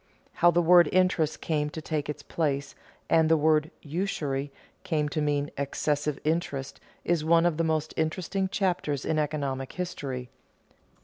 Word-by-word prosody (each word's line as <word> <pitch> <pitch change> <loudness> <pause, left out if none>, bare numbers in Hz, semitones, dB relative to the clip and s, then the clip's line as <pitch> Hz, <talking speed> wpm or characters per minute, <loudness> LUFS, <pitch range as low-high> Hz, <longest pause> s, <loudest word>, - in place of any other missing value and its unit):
How 175 - +5
the 175 0 +3
word 175 +1 +6
interest 180 -4 +2
came 150 -2 0
to 160 - -7
take 150 -1 -3
its 150 - -5
place, 140 -4 -2 0.3
and 160 -1 +4
the 160 - +5
word 155 0 +3
usury 145 -4 -2 0.3
came 150 -2 0
to 155 - -2
mean 145 -1 0
excessive 145 +1 -1
interest 150 -4 -2 0.3
is 170 -3 +1
one 165 +1 +4
of 170 -3 +1
the 165 - +1
most 155 -1 -1
interesting 185 +4 -1
chapters 175 -8 -1
in 155 - +1
economic 140 -3 -2
history. 135 -9 -5
155 Hz, 150 wpm, -27 LUFS, 145-170 Hz, 0.3 s, word